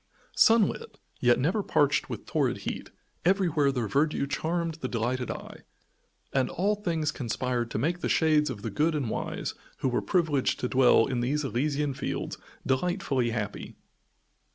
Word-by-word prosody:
Sunlit, 230 - +3 0.2
yet 120 -1 +4
never 170 +11 +1
parched 145 -6 +2
with - - -6
torrid - - 0
heat, - - -4 0.3
everywhere 170 -6 +3
their 125 -5 -2
verdure 140 +6 +1
charmed 165 +3 -1
the 130 - -1
delighted 125 +1 -2
eye, - - -7 0.7
and 130 -2 +2
all 200 +4 +1
things 165 -7 -1
conspired 125 -2 -2
to - - -3
make 165 +10 0
the - - -2
shades 155 -2 +3
of 105 -6 -6
the 115 - -3
good 155 +9 +1
and 135 -7 -1
wise, - - -3 0.3
who 130 - +2
were 125 - 0
privileged 160 -8 +1
to 125 - -1
dwell 125 -3 +5
in 130 -2 -2
these 140 +5 0
Elysian 140 +2 0
Fields, - - -4 0.3
delightfully 130 -3 0
happy. 110 -3 -4
140 Hz, 155 wpm, -28 LUFS, 125-165 Hz, 0.7 s, dwell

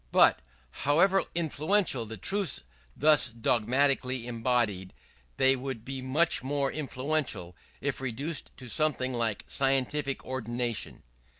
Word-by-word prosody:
But, - - +5 0.4
however 180 +7 +4
influential 160 - +1
the 110 +1 -7
truths 195 - 0 0.3
thus 150 -2 +4
dogmatically 125 +2 +1
embodied, 115 -5 -1 0.4
they 135 0 +5
would 130 -3 -5
be 135 0 -5
much 145 +6 +2
more 140 +1 -1
influential 135 - -3 0.3
if 140 -1 -2
reduced 135 +5 -3
to 125 - -8
something 130 -1 +1
like 115 -4 -1
scientific 135 +1 0
ordination. 120 -3 -3
130 Hz, 110 wpm, -29 LUFS, 120-145 Hz, 0.4 s, But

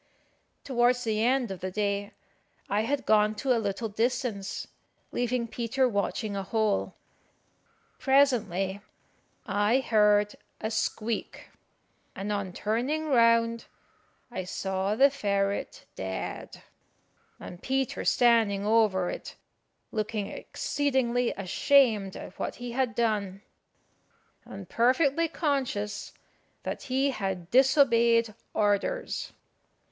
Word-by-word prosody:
Towards 245 -1 +2
the 220 -2 0
end 250 -2 +2
of 190 - -6
the 185 - -3
day 200 +1 -2 0.5
I 205 +1 +1
had 270 +5 -1
gone 215 0 +3
to 250 +4 +1
a 230 - 0
little 205 +2 -2
distance, 225 -2 -2 0.4
leaving 245 -1 -1
Peter 240 +3 0
watching 205 -1 -2
a 195 - -2
hole. 215 +1 0 1.0
Presently 210 -9 +2 0.6
I 205 +3 +2
heard 210 -4 +3 0.3
a 220 - -3
squeak, 220 0 -3 0.6
and 200 +2 -4
on 200 -2 -3
turning 255 - -1
round 230 -2 +3 0.7
I 190 -6 -4
saw 190 +2 -2
the 275 +4 +5
ferret 200 -6 -2
dead, 95 0 -6 0.8
and 175 - -10
Peter 265 0 -1
standing 225 -5 +3
over 210 -4 +3
it, - - -8 0.6
looking 215 -1 -2
exceedingly 255 -4 -1
ashamed 205 +1 +3
at 190 - -10
what - - -3
he 245 0 -6
had 250 -2 -1
done, 205 -4 -1 1.0
and 195 -2 -9
perfectly 275 - +2
conscious 270 - -2 0.5
that - - -4
he 270 +2 +2
had 190 -6 -4
disobeyed 235 -4 +4 0.2
orders. 210 - 0
225 Hz, 105 wpm, -28 LUFS, 200-250 Hz, 1.0 s, the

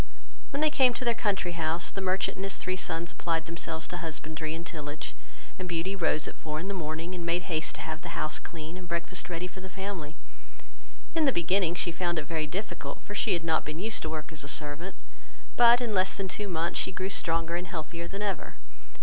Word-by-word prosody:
When 280 +1 -1
they 310 -1 +5
came 260 -5 +6
to 255 - -2
their 235 - +5
country 200 -5 +1
house, 165 0 0
the 195 - -3
merchant 190 +1 +2
and 190 - -4
his 195 0 -1
three 185 0 0
sons 170 -1 -2
applied 165 -1 0
themselves 165 -1 -1
to 175 - -3
husbandry 160 -1 -2
and 165 +1 -5
tillage; 150 -4 -4 0.5
and 185 -1 -3
Beauty 175 +3 0
rose 160 -4 +3
at - - -4
four 155 -1 -3
in 180 - -3
the 200 - -1
morning, 165 0 -2
and 175 -2 -3
made 170 +1 +2
haste 160 -3 -1
to - - -5
have 160 +1 -4
the - - -5
house 155 - +1
clean, 165 +1 -6
and 185 -1 -8
breakfast 170 +2 -1
ready 175 0 -1
for 185 +1 -7
the 190 - -7
family. 190 -5 -4 1.0
In 320 -2 +4
the 275 - +6
beginning 175 -2 +3
she 175 - +1
found 175 0 0
it 155 - 0
very 155 0 0
difficult, 200 +7 -4
for 205 - -6
she 205 0 +3
had 170 -2 +1
not 160 -1 +3
been 155 +1 -4
used 215 +5 +1
to 160 - -1
work 155 0 -4
as 155 -3 -1
a - - -6
servant; 150 +5 -1 0.6
but 240 0 +9
in 235 -3 0
less 185 -1 +3
than 195 - -1
two 205 +2 -2
months 170 -2 +1
she - - +1
grew 190 +1 -2
stronger 165 -2 +1
and 175 +1 -2
healthier 170 +1 -4
than 195 +3 -3
ever. 195 -5 -1
175 Hz, 230 wpm, -30 LUFS, 160-190 Hz, 1.0 s, but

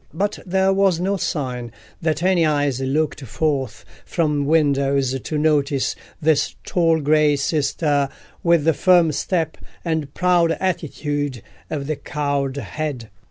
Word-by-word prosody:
But 200 +4 -1
there 190 +1 +2
was 195 -3 +2
no 195 +3 0
sign 125 - -3 0.3
that 160 0 0
any 185 -2 +3
eyes 145 -4 +1
looked 150 +4 -1
forth 135 -1 -2 0.2
from 150 -4 0
windows 140 -4 +2
to 155 - -4
notice 145 -3 +1 0.2
this 155 -3 +1
tall 165 -2 +2
grey 150 0 +3
sister, 145 0 0 0.3
with 170 -3 +3
the 165 +1 +3
firm 175 -1 +4
step, 165 +3 -1 0.3
and 160 -4 -1
proud 175 -2 +3
attitude 145 - -2 0.3
of 145 -3 -3
the 155 0 -2
cowled 140 -2 -2
head. 130 0 -5
150 Hz, 130 wpm, -21 LUFS, 140-165 Hz, 0.3 s, firm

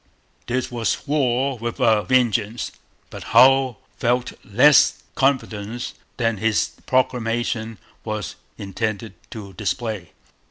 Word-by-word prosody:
This 125 +1 -2
was 120 +1 -2
war 135 -3 0
with 120 0 -4
a 110 -2 +4
vengeance. 120 -3 +1 0.4
But - - -8 0.2
Hull 135 -2 +5 0.2
felt 125 +1 0
less 125 +7 +4
confidence 120 -5 -1 0.2
than 115 -3 0
his 110 +1 +1 0.2
proclamation 115 -3 0 0.3
was 110 -2 -4 0.2
intended 110 +2 -4 0.2
to 100 -3 -9
display. 105 -2 -3
115 Hz, 105 wpm, -22 LUFS, 110-130 Hz, 0.4 s, Hull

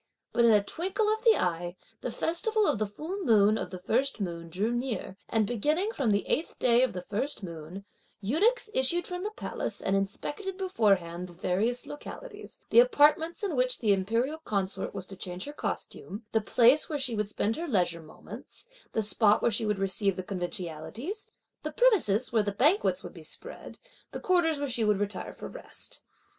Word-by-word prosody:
But 235 0 +4
in 230 - +7
a 210 -2 +5
twinkle 375 - -1
of 440 +1 -5
the 455 -2 +6
eye, 175 0 -1 0.3
the - - -3
festival 430 +6 0
of 285 - +1
the 215 - 0
full 330 - -5
moon 215 - +5
of 205 - -3
the 185 - -6
first 245 +8 0
moon 170 -3 -4
drew 200 +7 -1
near; 240 -5 -3
and 220 -2 +2
beginning 300 - 0
from 275 - 0
the 200 -1 +1
eighth 320 - -1
day 240 -1 +4
of 260 - +2
the 180 - -5
first 215 +5 -3
moon, 170 +3 -8 0.3
eunuchs 410 - +2
issued 335 +5 +1
from 360 0 -5
the 420 - -1
palace 430 - -4
and 195 - 0
inspected 295 - -2
beforehand 195 - +1
the - - -12
various 200 +8 0
localities, 425 +8 -9
the - - +8
apartments 325 -6 +4
in 380 -7 -1
which 250 0 +2
the 210 -4 +3
imperial 230 +10 0
consort 200 -10 -2
was 190 - -4
to 195 - -8
change 180 +1 -5
her 290 - -7
costume; 215 -6 -5
the 220 - +2
place 245 +6 +4
where 305 - -1
she 260 -4 0
would 210 -1 -1
spend 215 +1 0
her 340 +1 -4
leisure 180 - +1
moments; 155 - -12 0.3
the 220 - +1
spot 210 0 +3
where 235 - +3
she 215 +1 0
would 210 -1 +1
receive 195 0 0
the 185 - -4
conventionalities; 185 - -5 0.3
the - - -4
premises 260 - +3
where 225 - +4
the 205 -1 -1
banquets 300 - +3
would - - -8
be - - -11
spread; - - -5 0.4
the - - -4
quarters 345 -4 +2
where 285 0 -2
she 240 -3 +1
would 210 -2 +2
retire 205 0 -3
for - - -8
rest. - - -6
225 Hz, 195 wpm, -29 LUFS, 195-315 Hz, 0.4 s, the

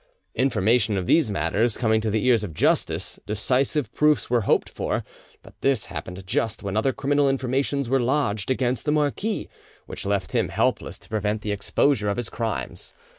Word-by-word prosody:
Information 110 -4 +2
of 90 - -2
these 155 - +3
matters 100 +5 0
coming 110 -2 +2
to 110 - -1
the 110 +3 0
ears 120 -4 +4
of 85 -7 -6
justice, - - 0
decisive 125 +5 0
proofs 150 -5 +2
were 120 -1 +3
hoped - - +3
for; - - -3 0.4
but - - -15
this 135 -6 +1
happened 90 +4 -6
just 110 +3 -1
when 100 0 -3
other 110 +5 +2
criminal 140 +1 +1
informations 135 +1 0
were 135 +2 +2
lodged 120 -5 0
against 130 -1 0
the 150 - +2
marquis, 155 +9 0 0.4
which - - -7
left 100 -2 -1
him - - +1
helpless - - 0
to - - -18
prevent 105 0 -1
the 105 - -2
exposure 105 +2 +1
of 100 - -1
his 120 -2 -3
crimes. 105 - -4
115 Hz, 175 wpm, -24 LUFS, 105-135 Hz, 0.4 s, ears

